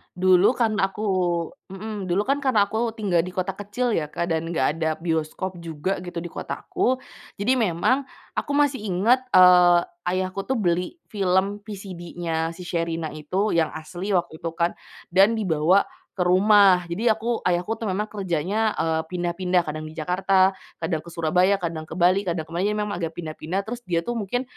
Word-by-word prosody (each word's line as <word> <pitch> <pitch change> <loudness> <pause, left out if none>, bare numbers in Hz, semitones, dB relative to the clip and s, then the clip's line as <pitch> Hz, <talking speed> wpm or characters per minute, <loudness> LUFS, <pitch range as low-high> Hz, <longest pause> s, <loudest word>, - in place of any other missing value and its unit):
Dulu 185 +2 +5
karena 215 -6 +1
aku 215 - -6 0.7
mhm, 210 +1 -6
dulu 185 +4 0
kan 285 +1 +1
karena 220 -7 +3
aku 225 +2 -1
tinggal 195 -7 +1
di 180 - -6
kota 185 +1 -2
kecil 210 +4 -2
ya 150 -2 -2
Kak, 170 - -2
dan 165 0 -1
nggak 130 -6 +1
ada 160 -1 0
bioskop 165 +3 -2
juga 165 +4 -3
gitu, 175 -1 -5
di 170 - -6
kotaku. 255 +8 -2 0.4
Jadi 245 +6 +2
memang 230 +5 +1 0.3
aku - - -2
masih 285 -5 +2
inget, 230 +9 +3
eee, 180 -1 +7 0.3
ayahku 185 +1 -2
tuh 260 +1 -1
beli 180 - -1
film 195 0 0
VCD-nya 175 -5 -4
si 175 +1 -10
Sherina 165 -1 -2
itu, 185 +8 -1
yang 160 -2 +2
asli 175 +5 -6
waktu 175 -4 0
itu 165 +1 -5
kan, 170 +1 -1 0.3
dan 195 +4 +5
dibawa 185 -3 +2 0.2
ke 180 -2 -1
rumah. 190 0 +6
Jadi 215 +8 -1
aku 225 +1 +1
ayahku 175 +3 0
tuh 225 - -3
memang 195 +2 0
kerjanya, 200 +3 -1
eee, 160 0 0
pindah-pindah, 180 +1 0
kadang 155 0 -5
di 155 - -11
Jakarta, 185 +3 +2 0.2
kadang 160 -4 -2
ke 155 - -15
Surabaya, 170 +4 +2
kadang 165 -4 -4
ke 160 - -8
Bali, 185 +3 +3
kadang 170 -2 -1
ke 160 - -18
mana. 175 +4 0
Jadi 210 - 0
memang 210 -1 -2
agak 165 -2 -4
pindah-pindah, 165 +3 -4
terus 235 +4 -6
dia 170 -2 0
tuh 240 +5 -3
mungkin 235 +5 -2
185 Hz, 180 wpm, -24 LUFS, 170-210 Hz, 0.7 s, eee